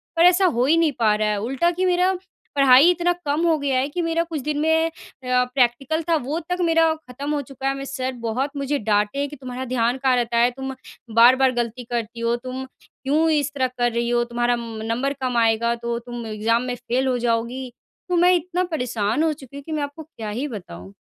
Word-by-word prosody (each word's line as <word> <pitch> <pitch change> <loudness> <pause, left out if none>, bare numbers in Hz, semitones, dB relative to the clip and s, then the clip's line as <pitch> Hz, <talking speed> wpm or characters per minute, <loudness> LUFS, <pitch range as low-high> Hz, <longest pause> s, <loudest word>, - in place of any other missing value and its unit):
पर 330 - +4
ऐसा 360 +2 +5
हो 250 -8 +2
ही 320 +4 +4
नहीं 330 -2 +3
पा 215 -2 +4
रहा 215 0 0
है। 210 - 0
उल्टा 270 +10 +1
की 365 +2 -1
मेरा 365 +1 +3 0.4
पढ़ाई 275 +3 +7
इतना 350 0 +1
कम 290 +2 0
हो 325 -2 +3
गया 275 -2 0
है 270 - 0
कि 350 +4 -3
मेरा 330 0 0
कुछ 330 -3 -5
दिन 295 +2 -2
में 320 +1 +3
अ, - - -7 0.3
प्रैक्टिकल 250 +4 +1
था 330 - +4
वो 310 +3 -1
तक 360 0 -1
मेरा 325 -1 +3
ख़त्म 280 -2 -8
हो 290 - 0
चुका 270 0 -6
है। 270 - +2
मैं 275 - -5
सर 260 -1 -3
बहुत 255 +5 -1
मुझे 280 +1 -1
डाँटे 210 +3 0
हैं 285 - 0
कि 295 - -9
तुम्हारा 255 -1 -6
ध्यान 240 0 0
कहाँ 260 -1 +2
रहता 235 -1 0
है? 240 +1 +5
तुम 265 +1 -6 0.4
बार-बार 255 +3 +6
गलती 240 0 -3
करती 235 -1 -3
हो 230 0 +1
तुम 255 +2 -6 0.4
क्यों 305 +4 +2
इस 295 -3 +1
तरह 260 -2 +1
कर 240 0 +2
रही 235 +1 -1
हो? 240 0 +2
तुम्हारा 240 0 0
म 230 -2 -7
नंबर 245 +5 -1
कम 250 -2 -1
आएगा 230 +1 +2
तो 235 0 -3
तुम 240 -1 -7
एग्ज़ाम 220 +2 +1
में 250 -1 -3
फ़ेल 245 +2 -1
हो 255 -1 +1
जाओगी। 240 +2 -1 0.4
तो 355 - +1
मैं 355 +1 +5
इतना 355 +1 -1
परेशान 240 -2 0
हो 320 - +2
चुकी 275 -2 -14
हूँ 285 - -9
कि 320 - -9
मैं 300 -2 -1
आपको 285 +3 -7
क्या 230 -9 -8
ही 245 +8 -3
बताऊँ? 100 - -9
260 Hz, 230 wpm, -22 LUFS, 235-300 Hz, 0.4 s, पढ़ाई